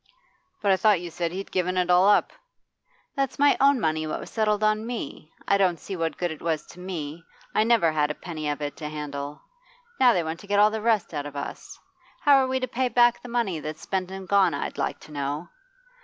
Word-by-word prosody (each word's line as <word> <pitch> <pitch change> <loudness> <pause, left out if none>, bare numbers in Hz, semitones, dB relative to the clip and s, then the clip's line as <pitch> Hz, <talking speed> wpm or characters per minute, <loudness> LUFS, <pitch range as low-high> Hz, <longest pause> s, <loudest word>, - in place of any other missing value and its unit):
'But 200 - +4
I 190 - +4
thought 210 -2 +4
you 175 -1 -7
said 170 0 -2
you'd 195 +2 -6
given 185 0 0
it 180 0 +2
all 180 +3 +6
up?' 210 - +3 0.8
'That's 275 -2 -1
my 285 0 +5
own 275 -1 +5
money, 155 -3 0
what 155 - -3
was - - -9
settled 215 -1 +1
on 215 +1 +1
me. 230 -9 -6 0.2
I 200 - +3
don't 180 -4 +2
see 195 - -6
what 165 -2 -2
good 175 -2 -1
it 160 - -8
was 160 -2 -1
to 180 - -13
me; 165 -3 -6 0.3
I 215 - +3
never 225 -8 +3
had 150 -1 +1
a 150 - -3
penny 155 -4 -5
of 145 0 -3
it 145 - -4
to 150 -2 -5
handle. 145 -1 -6 0.6
Now 250 -2 +6
they 175 - +1
want 160 +1 -4
to 200 - -13
get 205 0 +1
all 210 +1 +6
the 220 0 -3
rest 220 -6 +1
out 145 -1 -3
of 145 - -10
us. 140 - -7 0.4
How 285 -1 +6
are 265 -1 +3
we 260 0 0
to 255 - -1
pay 255 +1 -1
back 240 0 +4
the 245 - -10
money 230 -9 -1
that's 155 +1 -6
spent 185 -1 -2
and 190 0 -7
gone, 195 -6 +4
I'd - - -4
like - - -2
to - - -14
know? 145 +2 -3
185 Hz, 240 wpm, -25 LUFS, 155-215 Hz, 0.8 s, all